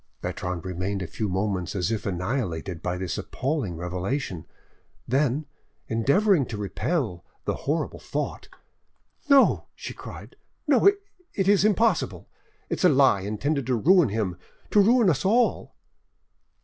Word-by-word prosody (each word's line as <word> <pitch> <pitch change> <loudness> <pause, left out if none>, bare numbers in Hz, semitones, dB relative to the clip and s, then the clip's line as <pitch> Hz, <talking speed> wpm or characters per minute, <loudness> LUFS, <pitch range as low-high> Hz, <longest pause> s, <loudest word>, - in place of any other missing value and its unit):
Bertrande 90 -1 -4
remained 95 +2 -3
a - - -4
few 105 +5 -3
moments 95 -1 -2
as 95 +2 0
if 110 -3 -2
annihilated 90 -3 -3
by 90 +2 -2
this 90 -1 -3
appalling 130 - -2
revelation; 90 - -3 0.6
then, 140 +3 +1 0.4
endeavoring 145 - +3
to 110 - -5
repel 105 - -2 0.2
the - - 0
horrible 150 +2 -2
thought— - - -4 0.8
"No," 280 -1 +5
she - - -7
cried, - - -10 0.3
"no, 290 +3 +4
it 380 - -1
is 200 -1 +5
impossible! 215 +2 +1 0.4
It - - -3
is - - +2
a - - +8
lie 135 - +4
intended 130 +8 -2
to 130 - +2
ruin 165 - +4
him 100 -4 -2 0.3
to 210 - +5
ruin 230 +2 +4
us 160 -7 +2
all." 230 +5 +1
125 Hz, 135 wpm, -25 LUFS, -, 0.8 s, a